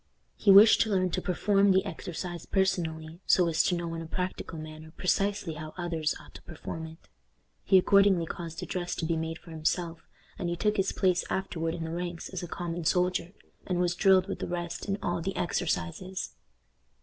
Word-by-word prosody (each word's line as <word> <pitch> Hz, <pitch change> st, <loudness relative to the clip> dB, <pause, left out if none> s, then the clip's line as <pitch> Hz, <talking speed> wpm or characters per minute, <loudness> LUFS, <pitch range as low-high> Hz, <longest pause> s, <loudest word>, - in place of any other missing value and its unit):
He 205 Hz, -, 0 dB
wished 205 Hz, +3 st, +9 dB
to 220 Hz, -, +2 dB
learn 185 Hz, -3 st, +1 dB
to 185 Hz, -, -1 dB
perform 200 Hz, +3 st, +2 dB
the 190 Hz, +1 st, +3 dB
exercise 175 Hz, -2 st, -6 dB
personally, 165 Hz, -4 st, -1 dB
so 180 Hz, -2 st, +5 dB
as 165 Hz, -1 st, +3 dB
to 180 Hz, -, +1 dB
know 170 Hz, -1 st, -3 dB
in 165 Hz, -, -4 dB
a 165 Hz, -, -7 dB
practical 180 Hz, -1 st, -4 dB
manner 155 Hz, 0 st, -9 dB
precisely 195 Hz, -1 st, 0 dB
how 155 Hz, 0 st, -8 dB
others 165 Hz, -3 st, -1 dB
ought -, -, -16 dB
to -, -, -11 dB
perform 160 Hz, 0 st, -7 dB
it. 160 Hz, +1 st, -15 dB, 0.6 s
He 190 Hz, -, +5 dB
accordingly 195 Hz, -2 st, +5 dB
caused 165 Hz, 0 st, -6 dB
a -, -, -3 dB
dress 180 Hz, -1 st, -3 dB
to 165 Hz, -, -3 dB
be 165 Hz, 0 st, 0 dB
made 160 Hz, 0 st, -3 dB
for 165 Hz, -, -14 dB
himself, 165 Hz, +1 st, -2 dB, 0.3 s
and 175 Hz, -, -1 dB
he 170 Hz, -, -1 dB
took 210 Hz, +4 st, 0 dB
his 195 Hz, 0 st, +1 dB
place 180 Hz, -2 st, +2 dB
afterward 165 Hz, -4 st, -2 dB
in 165 Hz, -, -4 dB
the 160 Hz, -, -4 dB
ranks 175 Hz, 0 st, -4 dB
as 185 Hz, -1 st, -5 dB
a 175 Hz, -, -5 dB
common 175 Hz, 0 st, -4 dB
soldier, 180 Hz, +1 st, +1 dB, 0.3 s
and 180 Hz, -2 st, 0 dB
was 175 Hz, -1 st, +2 dB
drilled 190 Hz, 0 st, +4 dB
with 195 Hz, -, -4 dB
the -, -, -3 dB
rest 175 Hz, +1 st, -4 dB
in 195 Hz, 0 st, 0 dB
all 175 Hz, -3 st, -1 dB
the 190 Hz, +3 st, -3 dB
exercises. 175 Hz, -, -2 dB
175 Hz, 200 wpm, -29 LUFS, 165-190 Hz, 0.6 s, wished